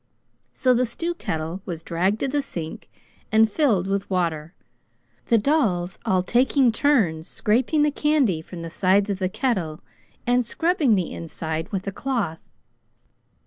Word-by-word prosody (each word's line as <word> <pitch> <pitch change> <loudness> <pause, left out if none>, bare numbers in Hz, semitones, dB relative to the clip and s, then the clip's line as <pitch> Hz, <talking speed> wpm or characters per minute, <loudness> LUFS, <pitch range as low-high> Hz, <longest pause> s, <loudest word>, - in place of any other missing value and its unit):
So 255 -2 +3
the 250 +1 +2
stew 335 +9 -3
kettle 165 - -4
was 170 -5 -6
dragged 185 +6 0
to - - +1
the 290 +2 0
sink 170 - -7 0.4
and 220 +1 +5
filled 220 - +2
with 195 0 -2
water, 170 -3 -1 0.7
the 230 - +4
dolls 205 - +1
all 185 -1 +2
taking 250 +4 +3
turns 210 - +1
scraping 255 - +1
the 300 - +2
candy 280 - +1
from 170 +1 -9
the 165 - -6
sides 195 +3 +2
of 195 - -3
the 185 -1 0
kettle, 195 - -2 0.4
and 245 +1 +3
scrubbing 305 - +2
the 185 -3 -1
inside 160 0 -5
with 195 -1 -3
a 200 - -2
cloth. 225 -8 -2
200 Hz, 150 wpm, -24 LUFS, 170-255 Hz, 0.7 s, and